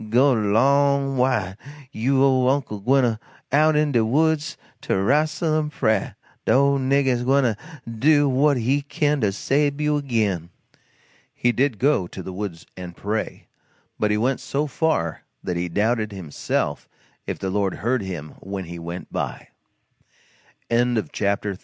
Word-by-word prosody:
Go 130 Hz, +5 st, +4 dB
'long 135 Hz, +6 st, +2 dB
wid 120 Hz, -8 st, 0 dB, 0.3 s
you 135 Hz, +4 st, +1 dB
ole 130 Hz, -2 st, +3 dB
Uncle 130 Hz, -7 st, -1 dB
Daniel 135 Hz, +7 st, +3 dB
gwyne 115 Hz, -3 st, 0 dB, 0.3 s
out 155 Hz, +2 st, +4 dB
in 150 Hz, -1 st, +2 dB
de 120 Hz, -4 st, +3 dB
woods 155 Hz, +6 st, +1 dB, 0.2 s
to -, -, -2 dB
rastle 155 Hz, -, +1 dB
in 150 Hz, -1 st, -2 dB
prah 110 Hz, -8 st, 0 dB, 0.3 s
de -, -, +1 dB
ole 140 Hz, +1 st, +4 dB
nigger 130 Hz, -2 st, +1 dB
gwyne 135 Hz, +2 st, +3 dB
to 115 Hz, -4 st, +1 dB, 0.3 s
do 145 Hz, +6 st, +3 dB
what 140 Hz, +2 st, +3 dB
he 130 Hz, +5 st, +1 dB
kin 145 Hz, 0 st, 0 dB
to 105 Hz, -2 st, +2 dB
sabe 140 Hz, +7 st, 0 dB
you 150 Hz, 0 st, +1 dB
agin." 105 Hz, -, -1 dB, 0.9 s
He 120 Hz, -, +2 dB
did 130 Hz, -1 st, 0 dB
go 130 Hz, -8 st, +2 dB
to 95 Hz, -, -8 dB
the 95 Hz, -, -7 dB
woods 90 Hz, -4 st, -6 dB
and 90 Hz, -2 st, -9 dB
pray; 105 Hz, +2 st, -3 dB, 0.5 s
but 105 Hz, -, +1 dB
he 105 Hz, -, +1 dB
went 125 Hz, +5 st, 0 dB
so 145 Hz, +2 st, -2 dB
far 150 Hz, -, -1 dB, 0.2 s
that 90 Hz, -, -2 dB
he 90 Hz, +1 st, -2 dB
doubted, 110 Hz, +4 st, 0 dB
himself, 90 Hz, -7 st, -3 dB, 0.4 s
if -, -, -3 dB
the 95 Hz, -, -3 dB
Lord 100 Hz, -1 st, 0 dB
heard 120 Hz, +2 st, 0 dB
him 85 Hz, -6 st, -6 dB
when 95 Hz, 0 st, -6 dB
He 85 Hz, 0 st, -8 dB
went 85 Hz, +2 st, -7 dB
by. -, -, -4 dB, 1.2 s
CHAPTER 110 Hz, -4 st, 0 dB
IV. 95 Hz, -, -8 dB
125 Hz, 160 wpm, -23 LUFS, 100-140 Hz, 1.2 s, Go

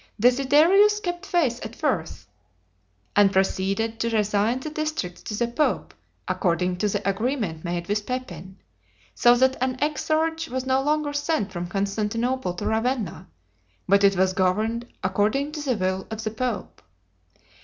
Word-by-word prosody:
Desiderius 300 Hz, -, +5 dB
kept 350 Hz, -1 st, -4 dB
faith 300 Hz, -11 st, +1 dB
at 220 Hz, +1 st, -7 dB
first, 210 Hz, -, -2 dB, 0.9 s
and 200 Hz, -1 st, +5 dB
proceeded 195 Hz, +4 st, 0 dB
to 230 Hz, -, 0 dB
resign 215 Hz, +2 st, +1 dB
the 300 Hz, +3 st, -6 dB
districts 310 Hz, -, -3 dB
to 210 Hz, -, -5 dB
the 235 Hz, -, +1 dB
pope, 270 Hz, +6 st, -1 dB, 0.3 s
according 180 Hz, -1 st, 0 dB
to 210 Hz, +3 st, 0 dB
the 205 Hz, 0 st, -2 dB
agreement 200 Hz, -, -1 dB
made 170 Hz, -1 st, -3 dB
with 210 Hz, 0 st, -1 dB
Pepin, 190 Hz, -8 st, -6 dB, 0.6 s
so 240 Hz, 0 st, +5 dB
that 260 Hz, +1 st, +3 dB
an 255 Hz, 0 st, 0 dB
exarch 320 Hz, +2 st, 0 dB
was 260 Hz, +1 st, -3 dB
no 260 Hz, 0 st, +2 dB
longer 295 Hz, +1 st, 0 dB
sent 290 Hz, -8 st, -1 dB
from 175 Hz, -1 st, -4 dB
Constantinople 210 Hz, +3 st, -1 dB
to 205 Hz, -, -5 dB
Ravenna, 225 Hz, 0 st, -1 dB, 0.6 s
but 200 Hz, +1 st, +4 dB
it 200 Hz, 0 st, +5 dB
was 185 Hz, 0 st, +2 dB
governed 215 Hz, +6 st, 0 dB, 0.2 s
according 210 Hz, +10 st, +1 dB
to 300 Hz, -1 st, -5 dB
the 260 Hz, -5 st, 0 dB
will 185 Hz, 0 st, -1 dB
of 220 Hz, 0 st, -5 dB
the 215 Hz, -, -2 dB
pope. 235 Hz, 0 st, -4 dB
225 Hz, 150 wpm, -24 LUFS, 195-275 Hz, 0.9 s, Desiderius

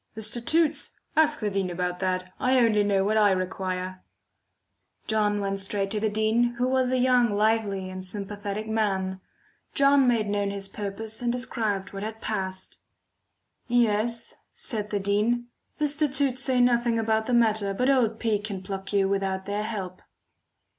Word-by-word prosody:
"The 220 Hz, -, -4 dB
statutes? 305 Hz, +8 st, +1 dB, 0.2 s
Ask 310 Hz, -3 st, +3 dB
the 210 Hz, -1 st, -1 dB
dean 195 Hz, -1 st, -1 dB
about 180 Hz, 0 st, -2 dB
that; 185 Hz, -1 st, -2 dB
I 260 Hz, +1 st, +3 dB
only 225 Hz, -4 st, +4 dB
know 200 Hz, -1 st, +2 dB
what 215 Hz, +2 st, +1 dB
I 210 Hz, -1 st, +5 dB
require." 185 Hz, 0 st, -3 dB, 1.0 s
John 210 Hz, -1 st, +1 dB
went 195 Hz, -1 st, -2 dB
straight 195 Hz, 0 st, -2 dB
to 215 Hz, -, 0 dB
the 215 Hz, +1 st, +1 dB
dean, 220 Hz, +3 st, +1 dB
who 245 Hz, +1 st, 0 dB
was 260 Hz, -1 st, +2 dB
a 255 Hz, -, +1 dB
young, 250 Hz, -1 st, +4 dB
lively 205 Hz, -2 st, +1 dB
and 185 Hz, 0 st, -6 dB
sympathetic 205 Hz, +2 st, -5 dB
man. 190 Hz, -4 st, -1 dB, 0.5 s
John 275 Hz, -1 st, +5 dB
made 230 Hz, -3 st, +2 dB
known 205 Hz, 0 st, 0 dB
his 200 Hz, -1 st, -4 dB
purpose 210 Hz, +3 st, -6 dB
and 240 Hz, -1 st, +1 dB
described 220 Hz, -6 st, -2 dB
what 195 Hz, -, -5 dB
had 220 Hz, +1 st, -5 dB
passed. 190 Hz, -4 st, -4 dB, 0.9 s
"Yes," 230 Hz, -1 st, +1 dB, 0.2 s
said 210 Hz, -5 st, -4 dB
the 205 Hz, -, -1 dB
dean, 215 Hz, +5 st, 0 dB, 0.3 s
"the 300 Hz, -, +1 dB
statutes 280 Hz, -3 st, +1 dB
say 260 Hz, -2 st, +1 dB
nothing 240 Hz, -1 st, +3 dB
about 220 Hz, -1 st, +1 dB
the 250 Hz, -, 0 dB
matter, 220 Hz, -4 st, +3 dB
but 250 Hz, +6 st, 0 dB
old 235 Hz, -5 st, +2 dB
P. 220 Hz, -3 st, +1 dB
can 200 Hz, -3 st, -5 dB
pluck 190 Hz, 0 st, -5 dB
you 200 Hz, -2 st, +3 dB
without 195 Hz, -1 st, -1 dB
their 205 Hz, +1 st, -2 dB
help." 195 Hz, -4 st, -5 dB
215 Hz, 165 wpm, -26 LUFS, 195-240 Hz, 1.0 s, I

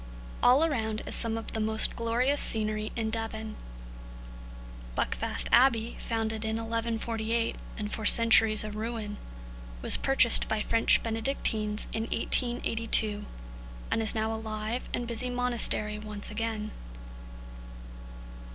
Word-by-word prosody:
All 260 Hz, +5 st, +5 dB
around 220 Hz, -8 st, -2 dB
is -, -, -4 dB
some 225 Hz, -1 st, +3 dB
of 225 Hz, -, -6 dB
the 220 Hz, -, -3 dB
most 220 Hz, 0 st, +1 dB
glorious 245 Hz, +5 st, +1 dB
scenery 215 Hz, -1 st, +1 dB
in 220 Hz, -2 st, -2 dB
Devon. 220 Hz, -1 st, -4 dB, 1.4 s
Buckfast -, -, -1 dB
Abbey, 235 Hz, -2 st, +3 dB
founded 225 Hz, -1 st, -2 dB
in 220 Hz, 0 st, -2 dB
1148 230 Hz, 0 st, -2 dB, 0.2 s
and 210 Hz, -1 st, -5 dB
for 220 Hz, -, -4 dB
centuries 225 Hz, 0 st, +5 dB
a 215 Hz, -, -6 dB
ruin, 215 Hz, -1 st, -5 dB, 0.7 s
was -, -, +4 dB
purchased 265 Hz, -4 st, +4 dB
by 220 Hz, -1 st, -1 dB
French 230 Hz, 0 st, +3 dB
Benedictines 220 Hz, -2 st, -1 dB
in 225 Hz, 0 st, -2 dB
1882, 230 Hz, -3 st, 0 dB, 0.6 s
and 225 Hz, -, +1 dB
is 220 Hz, -, 0 dB
now 220 Hz, 0 st, -1 dB
a 220 Hz, -, -5 dB
live 220 Hz, +2 st, -4 dB
and 240 Hz, -, -2 dB
busy 240 Hz, +2 st, 0 dB
monastery 240 Hz, -4 st, +1 dB
once 210 Hz, -1 st, -3 dB
again. 215 Hz, -1 st, -3 dB
225 Hz, 125 wpm, -28 LUFS, 215-230 Hz, 1.4 s, All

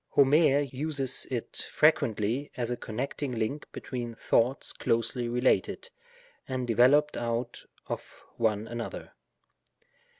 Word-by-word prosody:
Homer 145 Hz, +1 st, +5 dB
uses 135 Hz, -1 st, -1 dB
it 120 Hz, -3 st, -3 dB
frequently 120 Hz, -3 st, +2 dB
as 120 Hz, -1 st, -2 dB
a -, -, 0 dB
connecting 125 Hz, +4 st, -4 dB
liTiTr 115 Hz, +7 st, -2 dB
between 120 Hz, -2 st, -5 dB
thoughts 125 Hz, +4 st, +1 dB
closely 120 Hz, +1 st, -1 dB
related, 125 Hz, -, +1 dB, 0.6 s
and 130 Hz, -1 st, -2 dB
developed 130 Hz, +6 st, +4 dB
out 120 Hz, +1 st, -3 dB, 0.2 s
of -, -, -7 dB
one 110 Hz, -1 st, 0 dB
another. 120 Hz, 0 st, -6 dB
125 Hz, 105 wpm, -29 LUFS, 115-140 Hz, 0.6 s, Homer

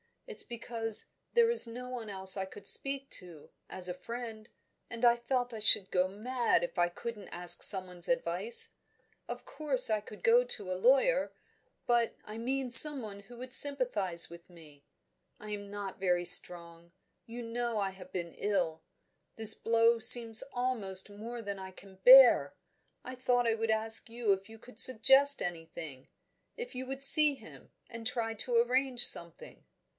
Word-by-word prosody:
It's 460 Hz, -3 st, -7 dB
because 230 Hz, -2 st, -4 dB, 0.3 s
there 470 Hz, -1 st, +2 dB
is 470 Hz, -, +3 dB
no 250 Hz, +2 st, -10 dB
one 240 Hz, -4 st, -9 dB
else 190 Hz, -1 st, -5 dB
I 190 Hz, -, -5 dB
could 200 Hz, +1 st, -16 dB
speak 275 Hz, +5 st, -4 dB
to, 170 Hz, -5 st, -7 dB, 0.2 s
as 185 Hz, -1 st, -3 dB
a -, -, -5 dB
friend, 225 Hz, +3 st, -10 dB, 0.4 s
and 230 Hz, 0 st, -10 dB
I 240 Hz, 0 st, +3 dB
felt 245 Hz, 0 st, -4 dB
I 220 Hz, -, -8 dB
should 200 Hz, -2 st, +3 dB
go 180 Hz, 0 st, -1 dB
mad 230 Hz, 0 st, -3 dB
if 175 Hz, -, -7 dB
I 175 Hz, -, +1 dB
couldn't 210 Hz, +3 st, -10 dB
ask 175 Hz, 0 st, +2 dB
someone's 180 Hz, -3 st, +1 dB
advice. 225 Hz, -2 st, +3 dB, 0.6 s
Of -, -, -9 dB
course 275 Hz, -6 st, +1 dB
I 215 Hz, -1 st, -1 dB
could 210 Hz, 0 st, -16 dB
go 480 Hz, +1 st, +2 dB
to 205 Hz, -, -5 dB
a -, -, -2 dB
lawyer 270 Hz, -, 0 dB, 0.5 s
but 235 Hz, -1 st, -1 dB
I 215 Hz, +1 st, -11 dB
mean 260 Hz, +1 st, -5 dB
someone 240 Hz, -6 st, +7 dB
who 225 Hz, +4 st, -17 dB
would 255 Hz, +1 st, -9 dB
sympathise 245 Hz, -12 st, +2 dB
with 170 Hz, +1 st, -16 dB
me. 155 Hz, -5 st, -19 dB, 0.5 s
I 215 Hz, 0 st, -12 dB
am 205 Hz, -1 st, -9 dB
not 200 Hz, -1 st, -9 dB
very 180 Hz, -2 st, -2 dB
strong; 170 Hz, -1 st, +4 dB, 0.3 s
you 235 Hz, +1 st, -10 dB
know 235 Hz, 0 st, -5 dB
I 195 Hz, -2 st, -3 dB
have 185 Hz, -1 st, -16 dB
been 170 Hz, -2 st, -7 dB
ill: 175 Hz, -6 st, -4 dB, 0.5 s
this 220 Hz, -1 st, +1 dB
blow 230 Hz, 0 st, 0 dB
seems 225 Hz, -1 st, +5 dB
almost 215 Hz, -7 st, -1 dB
more 230 Hz, +4 st, -10 dB
than 200 Hz, -1 st, -8 dB
I 190 Hz, 0 st, -10 dB
can 190 Hz, 0 st, -19 dB
bear; 245 Hz, -, +5 dB, 0.5 s
I 255 Hz, -, -10 dB
thought 250 Hz, -1 st, -2 dB
I 230 Hz, -, 0 dB
would 225 Hz, 0 st, -5 dB
ask 220 Hz, +1 st, 0 dB
you 230 Hz, -2 st, -3 dB
if 195 Hz, +1 st, -4 dB
you 225 Hz, -, -14 dB
could 250 Hz, +3 st, -12 dB
suggest 270 Hz, +4 st, +3 dB
anything 165 Hz, -5 st, -10 dB, 0.5 s
if 475 Hz, -5 st, -9 dB
you 255 Hz, 0 st, -8 dB
would 270 Hz, +1 st, -1 dB
see 295 Hz, +1 st, +7 dB
him, -, -, -18 dB, 0.2 s
and 230 Hz, -1 st, -8 dB
try 230 Hz, -2 st, -5 dB
to 235 Hz, +3 st, -6 dB
arrange 250 Hz, +1 st, +1 dB
something." 170 Hz, -1 st, -1 dB
225 Hz, 170 wpm, -29 LUFS, 190-250 Hz, 0.6 s, someone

